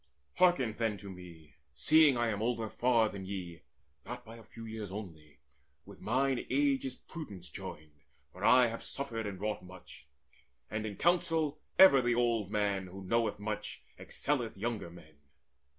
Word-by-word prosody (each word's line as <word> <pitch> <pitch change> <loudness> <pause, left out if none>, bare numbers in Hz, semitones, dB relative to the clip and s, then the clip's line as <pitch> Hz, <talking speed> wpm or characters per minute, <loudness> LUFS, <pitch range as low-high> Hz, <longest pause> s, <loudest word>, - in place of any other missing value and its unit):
Hearken 155 -11 +4
then 110 -3 0
to 100 0 -9
me, 85 -4 -13 0.2
Seeing 150 - +5
that 120 - -1
I 120 - +2
am 105 -1 -2
older 115 -1 -1
far 120 -2 +3
than 100 -2 -7
ye, 90 -4 -6 0.4
Not 125 +2 -7
by 115 +1 -10
a 115 - -13
few 115 0 -11
years 110 -3 -6
only: 80 -8 -9 0.4
with 100 -1 -13
mine 130 +3 +1
age 140 +1 +2
Is 130 -1 -4
prudence 100 - -9
joined, 75 -1 -9 0.3
for - - -10
I 125 0 +7
have 115 -1 -3
suffered 115 -6 -4
and 95 -2 -6
wrought 105 +1 -2
Much; 90 -5 -13 0.6
and 110 +1 -2
in 105 - -6
counsel 165 - +1 0.2
ever 140 -9 +9
the 120 -1 +1
old 115 -4 +1
man, 100 -2 0
Who 95 +2 -9
knoweth 115 +4 +1
much, 105 +1 -5 0.2
excelleth 125 -8 -2
younger 110 -3 -3
men. 80 -3 -16
110 Hz, 165 wpm, -32 LUFS, 95-125 Hz, 0.6 s, ever